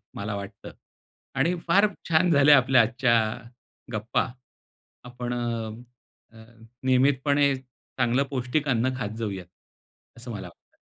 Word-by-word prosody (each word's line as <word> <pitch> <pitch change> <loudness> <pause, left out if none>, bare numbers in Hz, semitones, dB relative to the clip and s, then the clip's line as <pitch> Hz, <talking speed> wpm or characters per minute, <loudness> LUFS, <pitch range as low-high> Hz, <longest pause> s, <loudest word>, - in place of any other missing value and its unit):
मला 100 0 -4
वाटतं. 100 -1 -8 0.6
आणि 155 +7 +2
फार 200 +5 +5 0.2
छान 165 +2 +3
झाल्या 145 0 +7
आपल्या 130 -1 +5
आजच्या 120 +2 +1 0.8
गप्पा. 110 +3 -1 0.8
आपण 125 0 -6
अ, 120 0 -7 0.5
नियमितपणे 140 +2 +3
चांगलं 130 0 -2
पौष्टिक 135 +3 -1
अन्न 130 +1 +1
खात 110 -3 -4
जाऊयात 100 -5 -4 0.7
असं - - -9
मला - - -6
वाटतं. - - -24
125 Hz, 110 wpm, -26 LUFS, 115-140 Hz, 0.8 s, झाल्या